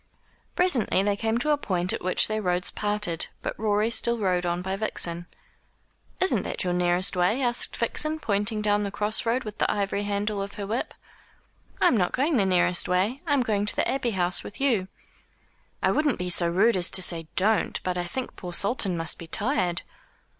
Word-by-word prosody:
Presently 265 - +2
they 205 0 +1
came 225 +2 -1
to 300 +5 +1
a 295 - +2
point 180 -6 0
at - - -4
which 185 0 +3
their 215 0 -2
roads 180 -2 -1
parted, 205 -5 -1 0.2
but - - -2
Rorie 215 +1 +1
still 235 0 +2
rode 180 -4 0
on 175 +1 -2
by 190 +1 -2
Vixen. 175 -4 -1 0.9
"Isn't 375 - +2
that - - -3
your 180 -1 -1
nearest 180 +1 +2
way?" 180 +7 +2
asked 240 -2 +1
Vixen, 305 +6 -1
pointing 210 -3 -1
down 205 0 +2
the 205 - -2
cross 210 +3 -2
road 245 +3 +1
with 215 -2 -8
the - - +2
ivory 200 0 -1
handle 205 0 -2
of 200 0 -6
her 205 - -5
whip. 225 +5 -3 0.8
"I - - +5
am - - +3
not 180 -3 0
going 285 +2 +1
the 195 -3 +2
nearest 180 -1 +2
way. 200 +9 0
I 290 - +2
am 275 - +2
going 210 -3 0
to - - +2
the - - +1
Abbey 265 -3 0
House 175 0 +1
with 205 - -10
you." 235 -9 +1 1.0
"I - - +3
wouldn't 300 -3 +1
be 180 0 -2
so 170 0 +3
rude 195 +5 +3
as 180 -1 +2
to 185 - +4
say 165 -2 0
Don't, 210 +4 +2
but 180 -1 -1
I 180 - -1
think 245 +9 -5
poor 180 -1 -8
Sultan 200 -2 +1
must 165 0 -3
be 170 - -9
tired." 185 - -1
205 Hz, 205 wpm, -26 LUFS, 180-230 Hz, 1.0 s, I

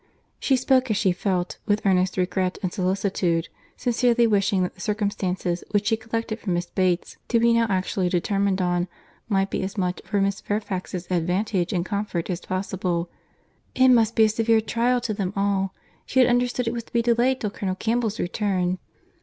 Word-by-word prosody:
She 270 - +2
spoke 260 0 +2
as 215 - +1
she 195 -3 +3
felt, 180 0 -2
with 210 0 +1
earnest 185 -1 +2
regret 185 0 0
and 180 - -1
solicitude—sincerely 200 +5 0
wishing 200 -3 +2
that 180 - -3
the 190 - -14
circumstances 190 -4 -1
which 205 0 +1
she 225 - +3
collected 225 0 -4
from 185 -6 -1
Miss 175 +1 -1
Bates 180 -1 -1
to 235 - +2
be 235 0 +4
now 230 0 +3
actually 185 -1 0
determined 195 +1 +1
on, 175 0 0 0.4
might 195 -2 +1
be - - -1
as 190 +2 -4
much 180 -2 -1
for 205 - -1
Miss 195 0 0
Fairfax's 190 -4 -3
advantage 180 +2 0
and 175 -1 0
comfort 200 -3 -2
as 175 0 -3
possible. 185 -2 -2 0.6
"It 260 0 +5
must 230 -2 +4
be 225 - +5
a 215 - +5
severe 225 +1 +3
trial 240 +3 +1
to 225 -2 -2
them 195 -2 -2
all. 195 -1 +1 0.4
She 260 - +1
had 255 - +6
understood 245 0 +1
it 230 - 0
was 235 -1 -4
to - - -23
be 235 -1 +2
delayed 240 +2 +2
till 210 - -2
Colonel 190 -2 -3
Campbell's 225 +1 -1
return." 185 -1 0
200 Hz, 185 wpm, -24 LUFS, 185-225 Hz, 0.6 s, had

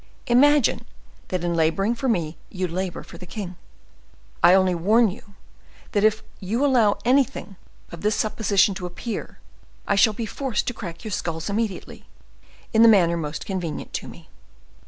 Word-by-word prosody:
Imagine 280 +2 +4 0.4
that 180 -2 -3
in 175 -1 0
laboring 165 +7 +1
for 255 +2 -2
me 170 -7 -1
you 185 -1 -3
labor 180 +1 -4
for - - -13
the 180 - -10
king. 185 -1 -6 0.9
I 180 - +7
only 185 -1 +3
warn 210 +6 +3
you 200 +1 -14 0.6
that 205 -2 +1
if 215 0 +2 0.2
you 225 +8 -1
allow 235 -7 +3
anything 260 -5 +1 0.4
of 170 - -9
this 210 0 +1
supposition 210 -2 +2
to 180 -1 -5
appear, 210 +6 -6 0.5
I - - +2
shall 200 +2 +4
be 225 +2 -4
forced 250 0 -2
to 245 - -2
crack 170 -7 -8
your 215 - -6
skulls 165 0 -3
immediately, 210 -2 -4 0.7
in 220 - +5
the 230 - +8
manner 175 -6 +4
most 155 -2 -4
convenient 180 -6 -5
to - - -4
me. - - -13
200 Hz, 165 wpm, -23 LUFS, 180-225 Hz, 0.9 s, the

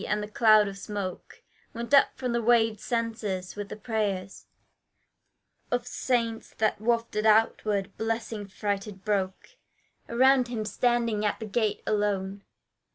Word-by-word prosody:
And 210 0 0
the - - -5
cloud 215 -1 +5
of 195 0 -7
smoke 200 -3 -6 0.3
Went 235 +4 -5
up 280 - +8
from 250 -2 -2
the 235 - +1
waved 225 -2 +3
censers, 220 -6 -3
with 205 -1 -6
the - - -6
prayers 205 -4 -3 1.2
Of 245 0 -1
saints, 235 -3 -2
that 215 -1 0
wafted 230 -2 0
outward 210 -2 +2
blessing 225 -2 -3
freighted 200 -1 -4
broke 200 - -2 0.5
Around 255 +1 +4
him 230 -3 -3
standing 235 -2 +1
at 210 - 0
the 220 - -5
gate 215 0 -1
alone. 200 -2 -1
215 Hz, 135 wpm, -27 LUFS, 205-235 Hz, 1.2 s, up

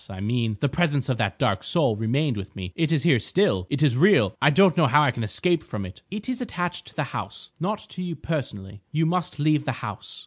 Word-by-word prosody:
I 95 -1 -8
mean, 110 +1 -1
the 145 - +3
presence 145 -2 0
of 130 - -1
that 100 -2 -1
Dark 100 - 0
Soul 140 -10 +2
remained 125 +6 0
with 100 -1 -7
me. 95 -1 -7
It 165 -1 0
is 155 -4 +1
here 150 -8 +4
still. 110 - +1
It 145 +1 0
is 140 -6 +4
real. 190 +9 +4
I 145 - +6
don't 185 +3 +5
know 160 -4 +4
how 145 +4 +5
I 145 - +3
can 115 - -5
escape 170 +10 +1
from 105 -8 -6
it." 90 - -11
"It 210 +4 -6
is 255 -1 -3
attached 175 -7 -4
to - - -15
the - - -1
house, - - -6
not 205 +6 -1
to 180 - -7
you 175 -2 -4
personally. 105 -12 -5
You 160 +1 +1
must 170 -1 -1
leave 150 0 +2
the 135 - -1
house." - - -7
145 Hz, 245 wpm, -24 LUFS, 110-170 Hz, -, I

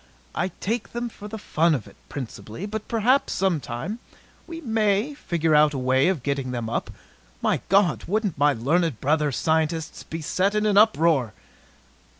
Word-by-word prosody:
"I 180 - 0
take 225 +3 -3
them 240 0 -3
for 210 -2 -10
the 220 +1 -6
fun 165 -5 +2
of 120 - -5
it, - - -15
principally. 130 - -6
But 215 0 -5
perhaps, 240 +4 +2
sometime, 175 - -2 0.5
we 330 -1 -7
may 220 -1 +1
figure 165 - -1
out 150 -1 +5
a - - -1
way 130 +2 +2
of 180 -9 0
getting 140 -2 -1
them 120 -2 -3
up. - - -2 0.5
My - - +1
God! 195 -4 +3
Wouldn't 205 -1 0
my 145 +1 +3
learned 145 +3 0
brother 150 +1 +1
scientists 160 +3 0
be 165 - -6
set 195 +6 +1
in 210 0 +1
an 210 -2 +2
uproar!" 165 - +4
170 Hz, 165 wpm, -24 LUFS, 145-210 Hz, 0.5 s, out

